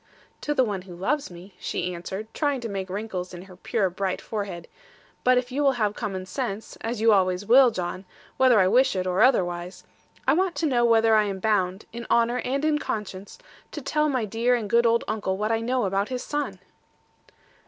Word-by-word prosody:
'To 295 - -2
the 260 - +4
one 205 -5 -2
who 180 -1 -11
loves 270 +12 -1
me,' 180 +2 -12
she 180 +1 -3
answered, 190 +4 -6
trying 285 -3 0
to 235 - -5
make 195 -3 -4
wrinkles 185 -2 -5
in 175 - -9
her 185 -1 -14
pure 195 +2 0
bright 185 +1 -2
forehead: 200 -6 -5 0.6
'but 255 0 +4
if 250 0 -1
you 280 +3 -1
will 275 -2 +4
have 215 -4 0
common 195 -4 -4
sense, 220 0 -4
as 230 0 -3
you 225 0 +5
always 185 0 +1
will, 255 +3 +7
John, 185 -2 -4 0.3
whether 255 -4 +5
I 185 - +4
wish 245 +3 +3
it 185 -1 -1
or 185 0 +1
otherwise 180 -7 +1 0.4
I - - +5
want 365 +1 +1
to 330 - -1
know 250 -5 +2
whether 225 -1 +4
I 215 -1 +5
am 195 -1 -3
bound, 190 -1 0
in 235 0 -7
honour, 235 +1 +2
and 275 +4 -1
in 305 -1 +2
conscience, 205 -6 -5 0.4
to 305 - -4
tell 300 +2 +1
my 255 -5 0
dear 230 +4 +1
and 225 -4 -3
good 235 +3 +4
old 230 0 +2
uncle 195 -3 -2
what 210 +2 -1
I 225 - +2
know 245 0 0
about 195 +1 0
his 250 -1 -3
son?' 295 0 -3
215 Hz, 210 wpm, -25 LUFS, 190-250 Hz, 0.6 s, will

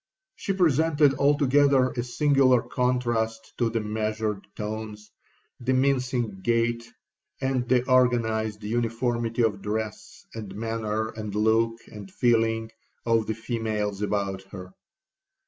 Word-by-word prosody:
'She - - -3
presented 160 -4 +3
altogether 140 -2 +4
a 120 - -2
singular 130 0 +3
contrast 120 -3 -1
to 120 -2 +2
the 115 0 -1
measured 110 -1 -2
tones, 105 0 -6 0.5
the 125 +2 0
mincing 125 -5 0
gait, 115 +1 0 0.5
and 130 -2 -1
the 125 0 +3
organized 110 -4 +2
uniformity 115 +1 -1
of 100 -3 0
dress, 110 +1 -5
and 105 -4 -7
manner, 110 0 -2
and 105 -2 -6
look, 110 +2 +2
and 105 -2 -9
feeling, 115 -1 +1 0.3
of 115 -2 +2
the 110 - -1
females 110 -3 -3
about 100 -2 -1
her. 95 -1 -9
115 Hz, 115 wpm, -26 LUFS, 110-125 Hz, 0.5 s, altogether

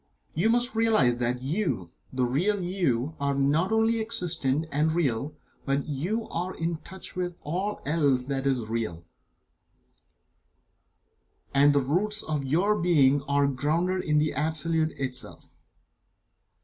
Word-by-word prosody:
You 180 +8 +2
must 240 +2 +2
realize 215 - +3
that 125 +1 -1
you 135 - -2 0.2
the 130 -1 0
real 180 +12 +1
You 160 -6 -1
are 140 0 0
not 145 +7 +2
only 225 +1 +2
existent, 165 -9 -1
and 150 +3 +2
real, 145 -3 -1 0.3
but 140 0 0
that - - -12
you 180 +11 -2
are 180 +2 -3
in 165 0 -2
touch 190 +3 -9
with 180 -1 -3
all 185 +7 -3
else 140 -4 +2
that 135 0 -2
is 130 -3 +1
real, 110 -7 -3 2.5
and 140 +1 +6
that - - +4
the 135 - +1
roots 210 +9 0
of 150 -3 -2
your 175 +10 +2
being 145 -5 +4
are 140 0 +3
grounded 160 +7 0
in 150 -1 +1
the 150 +1 +2
Absolute 160 +2 0
itself. 125 -2 -6
150 Hz, 140 wpm, -27 LUFS, 135-180 Hz, 2.5 s, and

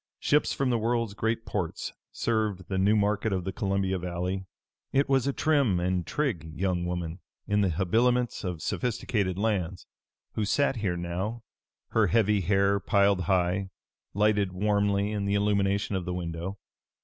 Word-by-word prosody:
Ships 150 +1 +2
from 135 -2 0
the 120 - +2
world's 115 -1 0
great 115 +2 -1
ports 90 -6 -3 0.2
served 110 -5 -1
the 95 -1 0
new 100 +3 +4
market 105 +1 +1
of 95 -2 -1
the 95 - -3
Columbia 95 -3 0
Valley. 90 +2 -3 0.5
It 140 +1 +2
was 135 -1 +2
a - - +2
trim 140 - +2
and 90 0 -1
trig 85 - -2
young 90 -2 0
woman 90 -1 -3 0.3
in 105 0 +2
the 100 - +2
habiliments 115 +10 +1
of 90 -4 -4
sophisticated 105 -6 -1
lands 95 -5 -1 0.5
who 110 - -1
sat 135 +5 +1
here 95 -5 -1
now, 95 +7 -3 0.5
her 110 -2 +3
heavy 105 0 +3
hair, 100 +2 +2
piled 100 -1 +2
high, 95 0 +1 0.5
lighted 105 -2 +2
warmly 100 +1 +1
in 105 -2 -2
the 100 0 +1
illumination 100 -1 +1
of 90 -2 -2
the 90 -1 -3
window. 85 +2 -4
100 Hz, 160 wpm, -28 LUFS, 90-110 Hz, 0.5 s, new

